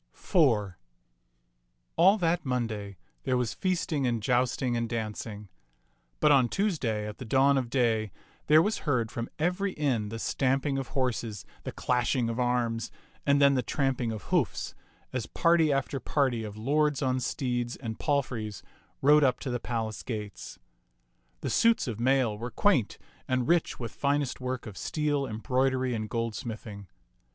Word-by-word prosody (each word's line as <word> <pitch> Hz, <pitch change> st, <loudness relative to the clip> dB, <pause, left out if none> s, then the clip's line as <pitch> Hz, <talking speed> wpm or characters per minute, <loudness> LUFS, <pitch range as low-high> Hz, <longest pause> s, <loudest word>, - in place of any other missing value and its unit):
IV 115 Hz, -, +2 dB, 1.2 s
All 190 Hz, +5 st, +6 dB
that 175 Hz, -2 st, +1 dB
Monday 110 Hz, -7 st, -3 dB, 0.2 s
there 130 Hz, -1 st, 0 dB
was 125 Hz, -3 st, -1 dB
feasting 170 Hz, -7 st, 0 dB
and 120 Hz, -2 st, 0 dB
jousting 125 Hz, 0 st, +1 dB
and 115 Hz, -1 st, -1 dB
dancing; 110 Hz, -2 st, -4 dB, 0.7 s
but 150 Hz, -, +5 dB
on 130 Hz, -4 st, +5 dB
Tuesday 135 Hz, -, -1 dB
at 105 Hz, -, -8 dB
the -, -, -5 dB
dawn 135 Hz, +4 st, +4 dB
of 130 Hz, -3 st, 0 dB
day 115 Hz, -5 st, +1 dB, 0.4 s
there 155 Hz, +2 st, +7 dB
was 215 Hz, +3 st, 0 dB
heard 125 Hz, -7 st, 0 dB
from 115 Hz, 0 st, -4 dB
every 180 Hz, +4 st, 0 dB
inn 125 Hz, -8 st, 0 dB
the 115 Hz, -, -5 dB
stamping 135 Hz, +3 st, 0 dB
of 135 Hz, -, -4 dB
horses, 115 Hz, -5 st, -2 dB, 0.2 s
the -, -, -3 dB
clashing 125 Hz, -1 st, 0 dB
of 115 Hz, -, -4 dB
arms, 120 Hz, -2 st, 0 dB, 0.4 s
and 140 Hz, 0 st, +5 dB
then 140 Hz, -1 st, +6 dB
the 130 Hz, -, +2 dB
tramping 130 Hz, -1 st, -1 dB
of 110 Hz, -4 st, -6 dB
hoofs, -, -, 0 dB, 0.4 s
as 130 Hz, -3 st, -2 dB
party 165 Hz, -2 st, +3 dB
after 135 Hz, 0 st, -1 dB
party 130 Hz, -7 st, 0 dB
of 105 Hz, -1 st, -7 dB
lords 145 Hz, +5 st, +1 dB
on 130 Hz, -1 st, +1 dB
steeds 120 Hz, -1 st, -2 dB
and 115 Hz, -4 st, -6 dB
palfreys 125 Hz, -, -1 dB, 0.4 s
rode 150 Hz, +2 st, +6 dB
up 130 Hz, -3 st, +3 dB
to 130 Hz, -, -3 dB
the 120 Hz, -, -1 dB
palace 115 Hz, -2 st, -3 dB
gates. 105 Hz, -6 st, -6 dB, 0.8 s
The -, -, -2 dB
suits 230 Hz, -8 st, +3 dB
of 115 Hz, -3 st, -4 dB
mail 130 Hz, -3 st, +2 dB
were 120 Hz, +2 st, -4 dB
quaint 140 Hz, -, +2 dB, 0.3 s
and 130 Hz, -1 st, 0 dB
rich 170 Hz, -1 st, +1 dB
with 115 Hz, -2 st, -4 dB
finest 140 Hz, -2 st, -1 dB
work 130 Hz, -1 st, -3 dB
of 105 Hz, -3 st, -8 dB
steel, 145 Hz, -3 st, -1 dB
embroidery, 130 Hz, +3 st, 0 dB
and 110 Hz, -2 st, -3 dB
goldsmithing. 110 Hz, -3 st, -4 dB
125 Hz, 155 wpm, -28 LUFS, 115-140 Hz, 1.2 s, there